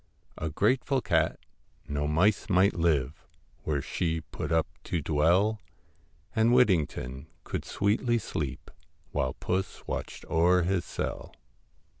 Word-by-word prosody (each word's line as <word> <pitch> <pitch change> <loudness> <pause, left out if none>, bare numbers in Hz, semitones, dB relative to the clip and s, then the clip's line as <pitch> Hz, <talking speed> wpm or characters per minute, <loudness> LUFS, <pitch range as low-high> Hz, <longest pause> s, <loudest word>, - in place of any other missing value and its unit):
A 80 - -2
grateful 130 - +2
cat! - - +1 0.5
no 75 0 -1
mice 90 +8 +2
might 95 +2 +4
live 75 -5 0 0.4
Where 70 -3 0
she 80 0 -1
put 80 - -6
up 80 -1 +3 0.2
to 85 - -1
dwell, 85 +9 +2 0.7
And 115 +1 +4
Whittington 80 - +2 0.2
could - - -4
sweetly 115 +4 +1
sleep 80 - -4 0.4
While 65 -1 0
puss 95 +1 -3
watched - - -5
o'er 90 +2 +3
his 90 0 0
cell. - - -5
85 Hz, 120 wpm, -28 LUFS, 75-100 Hz, 0.7 s, might